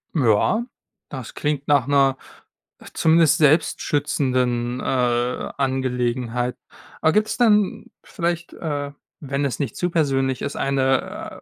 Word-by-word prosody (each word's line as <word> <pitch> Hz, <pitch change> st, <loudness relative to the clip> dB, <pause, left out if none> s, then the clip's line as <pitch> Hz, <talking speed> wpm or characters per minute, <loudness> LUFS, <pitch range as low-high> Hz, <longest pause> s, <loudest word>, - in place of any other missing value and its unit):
Ja. 130 Hz, -, +2 dB, 0.4 s
Das 130 Hz, -5 st, -7 dB
klingt 145 Hz, -2 st, -2 dB
nach 140 Hz, -4 st, +3 dB
'ner, 135 Hz, -2 st, +3 dB, 0.8 s
zumindest 160 Hz, -2 st, +4 dB
selbst 155 Hz, +1 st, +3 dB
schützenden, 125 Hz, -4 st, 0 dB
äh, -, -, -6 dB, 0.7 s
Angelegenheit. 125 Hz, -2 st, -1 dB, 0.5 s
Aber 160 Hz, -, +4 dB
gibt's 215 Hz, 0 st, +1 dB
dann 210 Hz, -5 st, +2 dB, 0.2 s
vielleicht, 170 Hz, 0 st, -3 dB
äh, 145 Hz, -3 st, -4 dB, 0.3 s
wenn 140 Hz, -1 st, -3 dB
es 135 Hz, -, -3 dB
nicht 140 Hz, -, -3 dB
zu 175 Hz, -, -1 dB
persönlich 135 Hz, -6 st, 0 dB
ist, 140 Hz, -, -4 dB
eine, 135 Hz, -1 st, -1 dB
140 Hz, 115 wpm, -22 LUFS, 130-160 Hz, 0.8 s, zumindest